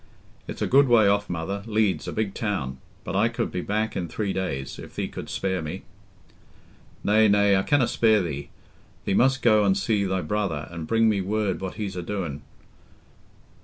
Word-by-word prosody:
"It's -, -, -4 dB
a -, -, +1 dB
good 135 Hz, +1 st, +5 dB
way 115 Hz, -4 st, +5 dB
off, 100 Hz, +1 st, +1 dB
mother—Leeds, 100 Hz, +4 st, -1 dB
a -, -, -3 dB
big 105 Hz, -3 st, -2 dB
town. 75 Hz, -, -3 dB, 0.2 s
But -, -, -5 dB
I -, -, +3 dB
could -, -, -3 dB
be 90 Hz, -, -3 dB
back 110 Hz, +3 st, -1 dB
in 90 Hz, -2 st, -2 dB
three 100 Hz, +2 st, -3 dB
days, 70 Hz, -8 st, -4 dB
if -, -, -11 dB
thee -, -, -2 dB
couldst -, -, -7 dB
spare 95 Hz, -2 st, -1 dB
me." 80 Hz, +5 st, -6 dB, 1.2 s
"Nay, 110 Hz, +1 st, +4 dB
nay, 100 Hz, -1 st, +4 dB
I 95 Hz, -, +3 dB
canna 135 Hz, +3 st, +2 dB
spare 110 Hz, -3 st, +3 dB
thee. 70 Hz, -4 st, -5 dB, 0.6 s
Thee -, -, 0 dB
must 130 Hz, +5 st, +3 dB
go 110 Hz, -3 st, +5 dB
an' 95 Hz, -1 st, +3 dB
see 105 Hz, -1 st, +1 dB
thy 95 Hz, -1 st, -1 dB
brother, 85 Hz, -3 st, -2 dB
an' 85 Hz, -2 st, -6 dB
bring 115 Hz, +4 st, +3 dB
me 105 Hz, -3 st, +2 dB
word 100 Hz, 0 st, -1 dB
what 95 Hz, -1 st, -5 dB
he's 100 Hz, -3 st, -4 dB
a 90 Hz, -, -3 dB
doin'. 85 Hz, -6 st, -4 dB
100 Hz, 190 wpm, -25 LUFS, 90-110 Hz, 1.2 s, good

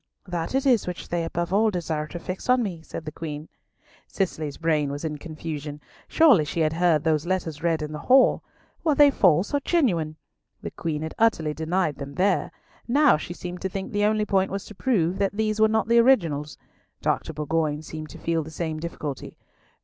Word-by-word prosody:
"That 175 Hz, +3 st, -3 dB
it 270 Hz, +1 st, +1 dB
is 245 Hz, -8 st, +3 dB
which 180 Hz, -1 st, -6 dB
they 170 Hz, -1 st, -1 dB
above 170 Hz, +2 st, -3 dB
all 220 Hz, +2 st, +4 dB
desire 160 Hz, -5 st, -2 dB
to 175 Hz, -, -7 dB
fix 185 Hz, +6 st, -6 dB
on 250 Hz, -1 st, +4 dB
me," 180 Hz, -6 st, -4 dB
said 160 Hz, -, -8 dB
the 155 Hz, -, -5 dB
Queen. 155 Hz, -1 st, -6 dB, 0.6 s
Cicely's 155 Hz, -7 st, -3 dB
brain 155 Hz, -3 st, +1 dB
was 145 Hz, +3 st, -5 dB
in 150 Hz, -2 st, -4 dB
confusion. 155 Hz, -2 st, -6 dB, 0.3 s
Surely 285 Hz, -, +5 dB
she 160 Hz, +2 st, -2 dB
had 155 Hz, 0 st, +2 dB
heard 165 Hz, -3 st, +2 dB
those 160 Hz, 0 st, +1 dB
letters 170 Hz, -5 st, -2 dB
read 165 Hz, -2 st, 0 dB
in 150 Hz, -, -5 dB
the 150 Hz, -, -5 dB
hall. 260 Hz, +1 st, +6 dB, 0.4 s
Were 310 Hz, -3 st, +2 dB
they 290 Hz, -1 st, +7 dB
false 185 Hz, -, +3 dB
or 285 Hz, -, +3 dB
genuine? 190 Hz, -, +1 dB, 0.5 s
The -, -, -5 dB
Queen 155 Hz, -2 st, -3 dB
had 160 Hz, -, -5 dB
utterly 165 Hz, -9 st, +2 dB
denied 160 Hz, 0 st, -1 dB
them 140 Hz, 0 st, -7 dB
there. 190 Hz, 0 st, +1 dB, 0.4 s
Now 285 Hz, +4 st, +5 dB
she 175 Hz, +3 st, -7 dB
seemed 180 Hz, 0 st, -7 dB
to 190 Hz, -, -2 dB
think 190 Hz, +1 st, -5 dB
the 205 Hz, 0 st, +1 dB
only 215 Hz, 0 st, +2 dB
point 195 Hz, -1 st, +1 dB
was 195 Hz, 0 st, -4 dB
to -, -, -11 dB
prove 190 Hz, -6 st, 0 dB
that 200 Hz, 0 st, +1 dB
these 215 Hz, 0 st, -1 dB
were 220 Hz, -, +7 dB
not 220 Hz, 0 st, +1 dB
the 235 Hz, 0 st, +5 dB
originals. 165 Hz, -, +2 dB, 0.5 s
Dr. -, -, 0 dB
Bourgoin 155 Hz, 0 st, -1 dB
seemed 155 Hz, 0 st, -7 dB
to -, -, -10 dB
feel 165 Hz, -1 st, -1 dB
the 155 Hz, -, -8 dB
same 160 Hz, 0 st, -4 dB
difficulty. 155 Hz, -4 st, -6 dB
170 Hz, 205 wpm, -25 LUFS, 155-205 Hz, 0.6 s, they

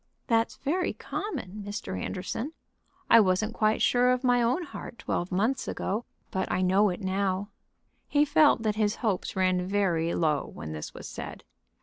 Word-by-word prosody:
"That's 230 Hz, -1 st, +1 dB
very 350 Hz, +6 st, -1 dB
common, 210 Hz, -, -5 dB
Mr. 205 Hz, -, -5 dB
Anderson. 190 Hz, -, -4 dB, 0.5 s
I 230 Hz, -, +8 dB
wasn't 210 Hz, +2 st, +2 dB
quite 215 Hz, -1 st, +2 dB
sure 245 Hz, 0 st, +4 dB
of 250 Hz, +1 st, +1 dB
my 245 Hz, -1 st, +4 dB
own 250 Hz, +9 st, +1 dB
heart 275 Hz, -5 st, -8 dB
twelve 175 Hz, -, -2 dB
months 220 Hz, +9 st, 0 dB
ago, 215 Hz, +5 st, -2 dB, 0.3 s
but 190 Hz, -, -1 dB
I 185 Hz, -, +1 dB
know 195 Hz, +3 st, +4 dB
it 180 Hz, +3 st, -4 dB
now." 190 Hz, +1 st, -1 dB, 0.6 s
He 290 Hz, 0 st, +3 dB
felt 290 Hz, -4 st, +4 dB
that 215 Hz, -1 st, +2 dB
his 215 Hz, -1 st, +2 dB
hopes 195 Hz, -5 st, -1 dB
ran 185 Hz, -1 st, +2 dB
very 180 Hz, -5 st, +1 dB
low 155 Hz, -4 st, +1 dB
when 80 Hz, +1 st, -7 dB
this 75 Hz, -1 st, -6 dB
was -, -, -8 dB
said. -, -, -7 dB
205 Hz, 165 wpm, -28 LUFS, 185-245 Hz, 0.6 s, I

